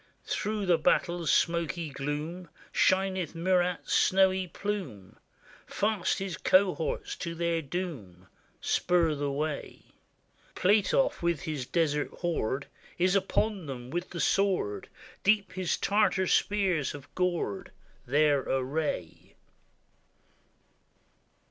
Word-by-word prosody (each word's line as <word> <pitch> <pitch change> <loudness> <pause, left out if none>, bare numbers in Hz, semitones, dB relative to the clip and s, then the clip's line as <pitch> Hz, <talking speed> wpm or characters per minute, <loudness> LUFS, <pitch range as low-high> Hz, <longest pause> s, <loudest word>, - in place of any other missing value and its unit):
Through 210 -1 -2
the 175 -3 +3
battle's 170 -2 +1
smoky 170 -1 +1
gloom 150 +6 -4 0.2
Shineth 185 -3 +1
Murat's 180 0 +1
snowy 190 -1 +3
plume; 170 - -5 0.5
Fast 210 -3 0
his 195 -3 -4
cohorts 185 -3 +1
to 170 -1 -5
their 170 0 0
doom 135 - -6 0.4
Spur 170 -3 +2
the 145 -1 -2
way. 150 +1 -4 0.7
Platoff, 210 - +2
with 170 -3 0
his 145 -5 -4
desert 150 -4 0
horde, 140 -6 -1 0.3
Is 180 +1 +2
upon 195 -1 0
them 125 -2 -7
with 175 +2 -3
the 170 - -6
sword; 190 - +1 0.3
Deep 205 0 +3
his 185 -2 -1
Tartar 200 -2 +2
spears 185 -7 +1
have 145 -2 -10
gored 180 +1 -1 0.4
Their 145 +2 +3
array. 135 - -3
170 Hz, 105 wpm, -29 LUFS, 150-190 Hz, 0.7 s, the